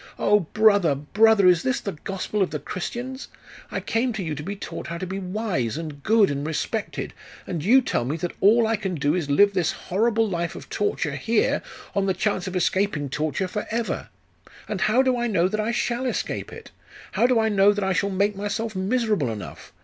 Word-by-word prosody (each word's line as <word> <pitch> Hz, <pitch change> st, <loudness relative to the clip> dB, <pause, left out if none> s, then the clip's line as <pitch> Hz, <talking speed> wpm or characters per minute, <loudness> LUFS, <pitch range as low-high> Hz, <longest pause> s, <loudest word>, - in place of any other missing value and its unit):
Oh! 210 Hz, +1 st, +4 dB
brother, 200 Hz, -3 st, +3 dB
brother, 205 Hz, +8 st, +4 dB
is 175 Hz, -2 st, +5 dB
this 260 Hz, +5 st, 0 dB
the 200 Hz, -, -4 dB
Gospel 195 Hz, +5 st, -4 dB
of 190 Hz, -, +2 dB
the 150 Hz, -, -3 dB
Christians? 245 Hz, -, -5 dB, 0.4 s
I -, -, -3 dB
came 235 Hz, +2 st, 0 dB
to 210 Hz, -3 st, -3 dB
you 160 Hz, -3 st, -3 dB
to 150 Hz, -, -5 dB
be 195 Hz, +6 st, -5 dB
taught 200 Hz, -, -7 dB
how 170 Hz, 0 st, -4 dB
to 185 Hz, -, -4 dB
be 190 Hz, +2 st, -4 dB
wise, 180 Hz, -, -2 dB
and 155 Hz, -3 st, -6 dB
good, 215 Hz, 0 st, +4 dB
and 140 Hz, 0 st, -3 dB
respected, 160 Hz, +8 st, -3 dB, 0.3 s
and 170 Hz, -5 st, -4 dB
you 250 Hz, +8 st, +6 dB
tell 240 Hz, -, -1 dB
me 140 Hz, +6 st, -2 dB
that 175 Hz, +1 st, -3 dB
all 225 Hz, +4 st, +5 dB
I 225 Hz, 0 st, +1 dB
can 190 Hz, -3 st, -3 dB
do 145 Hz, 0 st, +1 dB
is 170 Hz, -4 st, -1 dB
to 140 Hz, -, 0 dB
live 200 Hz, +6 st, +5 dB
this 180 Hz, -4 st, +1 dB
horrible 225 Hz, +4 st, +1 dB
life 170 Hz, -3 st, -2 dB
of -, -, -10 dB
torture 415 Hz, -, -1 dB
here, 230 Hz, -1 st, +1 dB, 0.3 s
on 200 Hz, -1 st, +1 dB
the 190 Hz, -, +1 dB
chance 190 Hz, -1 st, -1 dB
of 185 Hz, -, -5 dB
escaping 180 Hz, -5 st, 0 dB
torture 155 Hz, +6 st, -1 dB
forever! 220 Hz, +4 st, -3 dB, 0.6 s
And 210 Hz, -4 st, -3 dB
how 240 Hz, +7 st, +4 dB
do 260 Hz, -1 st, +2 dB
I 240 Hz, -, 0 dB
know 185 Hz, -5 st, +2 dB
that 215 Hz, +3 st, -2 dB
I 215 Hz, +1 st, 0 dB
shall 240 Hz, +1 st, -1 dB
escape -, -, -3 dB
it? -, -, -11 dB, 0.4 s
How 240 Hz, -, +3 dB
do 250 Hz, -2 st, +3 dB
I 220 Hz, 0 st, +2 dB
know 200 Hz, -1 st, +5 dB
that 205 Hz, -1 st, -2 dB
I 190 Hz, 0 st, +1 dB
shall 200 Hz, +3 st, +1 dB
make 200 Hz, +2 st, +1 dB
myself 205 Hz, +2 st, -3 dB
miserable 210 Hz, -, 0 dB
enough? 105 Hz, -3 st, -8 dB
200 Hz, 215 wpm, -24 LUFS, 170-220 Hz, 0.6 s, you